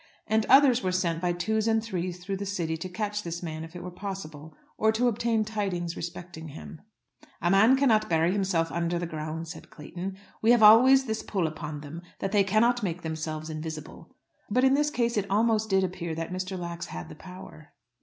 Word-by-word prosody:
And 220 0 +1
others 265 -2 +6
were 185 - 0
sent 170 -3 0
by 180 -1 +1
twos 215 +5 -1
and 225 -1 +2
threes 180 -4 -4
through 195 +1 -3
the 200 - -4
city 170 -5 -2
to 165 +3 -6
catch 210 +2 -3
this 170 -2 -5
man 160 -1 -5
if 165 +2 -11
it 175 - -7
were 180 - -6
possible, 160 -6 -7 0.2
or 220 0 +3
to 235 +3 +1
obtain 225 -1 +1
tidings 195 -6 -3
respecting 170 -1 -7
him. 155 +1 -10 0.6
"A 175 - +1
man 220 +7 +6
cannot 235 -6 +3
bury 165 +1 +3
himself 185 -4 0
under 170 0 -1
the 175 - -2
ground," 160 0 -5
said 160 - -10
Clayton; 180 +5 -7 0.2
"we 225 - +2
have 235 -2 +4
always 260 +5 +8
this 220 -2 -2
pull 190 -5 -1
upon 155 -1 -5
them, 150 +3 -8 0.2
that 195 - -3
they 205 -1 +4
cannot 230 +5 +2
make 180 -3 -3
themselves 160 -1 -4
invisible." 155 +1 -8 0.3
But 250 +5 +2
in 265 0 +5
this 295 +1 +2
case 235 -5 0
it 200 -1 -1
almost 220 +1 +2
did 190 -1 +3
appear 175 -3 -3
that 165 +2 -4
Mr. 185 +1 -4
Lax 170 -1 -5
had 85 0 -7
the - - -10
power. 180 -3 -12
185 Hz, 205 wpm, -27 LUFS, 165-215 Hz, 0.6 s, always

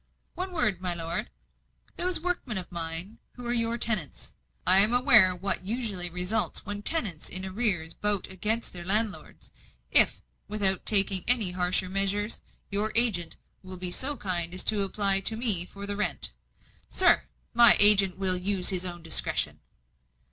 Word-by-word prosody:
"One 370 +1 -8
word, 210 - -3
my 180 -2 -2
lord. 165 0 -4 0.7
Those 360 0 0
workmen 325 - -6
of 185 0 -8
mine, 170 +5 -7
who 245 - -13
are 240 - -4
your 230 0 -3
tenants 215 -10 -2 0.3
I 185 +1 +5
am 210 +4 +3
aware 240 -8 +4
what 195 +3 -3
usually 200 -3 -4
results 180 +5 -2
when 205 0 -8
tenants 205 - -2
in 185 +1 +1
arrear 190 -4 0
vote 205 -2 -1
against 215 +5 -4
their 175 -1 -10
landlords 210 +3 -5 0.4
if, - - +2 0.2
without 200 -3 +2
taking 195 -3 +6
any 230 -7 +3
harsher 180 +1 -3
measures, 195 +3 -4 0.3
your 210 +2 -3
agent 215 -8 +1 0.3
will 185 -1 -11
be 180 0 -2
so 275 +9 -3
kind 175 -3 -5
as 185 - -2
to 215 -2 -1
apply 195 0 +1
to 220 +3 -2
me 205 -7 +4
for 200 +1 -12
the 205 0 -7
rent 210 - -3 0.3
" - - -35 0.3
"Sir, 365 -2 +1 0.3
my 235 -1 +5
agent 200 -2 +8
will 190 -1 +1
use 185 0 +3
his 185 -1 +3
own 175 -1 -8
discretion." 165 - +1
200 Hz, 160 wpm, -24 LUFS, 180-220 Hz, 0.7 s, agent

